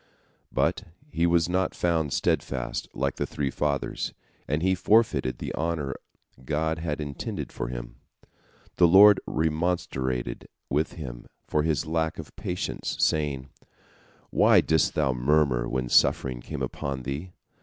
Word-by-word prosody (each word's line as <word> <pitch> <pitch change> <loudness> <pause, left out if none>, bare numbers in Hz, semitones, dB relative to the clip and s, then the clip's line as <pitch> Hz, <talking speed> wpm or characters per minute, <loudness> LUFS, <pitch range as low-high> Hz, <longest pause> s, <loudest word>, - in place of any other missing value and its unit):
But - - 0 0.3
he 85 +1 +2
was 85 -1 +3
not 90 +1 0
found 80 -4 0
steadfast - - -1
like - - -1
the - - -1
three 70 -2 -2
Fathers, 70 -2 -2 0.3
and 75 +3 -1
he 95 0 +3
forfeited 90 - +2
the - - -5
honor 80 -4 -2 0.5
God 80 +3 -1
had 80 -3 -3
intended 70 -2 -5
for - - -4
him. - - -7 0.8
The 90 - +6
Lord 100 +4 +8
remonstrated 75 -7 -1 0.2
with 75 +4 0
him 60 -7 -8 0.2
for 75 - +1
his 80 -1 0
lack 80 0 -1
of 80 - -9
patience, 90 -4 -3
saying: 70 -4 0 0.8
"Why - - +6
didst 80 -1 +2
thou 70 -4 +2
murmur 65 -1 +2
when 65 0 -1
suffering - - +3
came - - -5
upon 70 -2 -4
thee? 70 +8 -5
75 Hz, 135 wpm, -26 LUFS, 65-85 Hz, 0.8 s, Lord